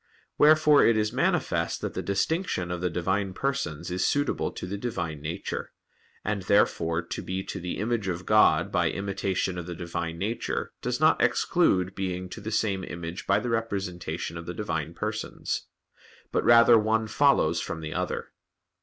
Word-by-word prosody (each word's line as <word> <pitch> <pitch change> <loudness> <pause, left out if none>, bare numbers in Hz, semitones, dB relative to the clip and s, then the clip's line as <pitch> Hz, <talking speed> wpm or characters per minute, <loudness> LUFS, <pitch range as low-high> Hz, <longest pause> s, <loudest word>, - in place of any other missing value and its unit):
Wherefore 150 -1 +6
it 115 -1 +4
is 105 +1 0
manifest 135 - 0
that - - -3
the - - -3
distinction 100 - -1
of 90 -1 -3
the 90 - +1
Divine 95 +3 -1
Persons 90 - -2
is 90 0 0
suitable 145 -1 0
to - - -7
the 95 +3 -4
Divine 85 -10 -3
Nature; 80 +3 -5 0.5
and 105 -1 -1
therefore 85 -4 +2
to 85 - -5
be 95 +1 -3
to - - -6
the 90 0 -4
image 110 0 -1
of 90 0 -3
God 105 0 +4
by - - +2
imitation 95 -2 -2
of 85 - -7
the 90 - -5
Divine 85 -1 -4
Nature 105 +6 -3
does - - -2
not - - +4
exclude 90 0 +2
being 90 -1 -3
to 105 - -8
the 105 - -5
same 100 -3 0
image 85 0 -6
by 100 +1 +4
the 125 - -3
representation 90 -7 -3
of 85 - -10
the 90 - -5
Divine 80 -6 -3
Persons: 110 0 -3 0.6
but - - +1
rather 115 -1 +7
one 110 +1 +1
follows 110 - +3
from 80 -3 -4
the 80 0 -5
other. - - -3
95 Hz, 170 wpm, -27 LUFS, 85-110 Hz, 0.6 s, rather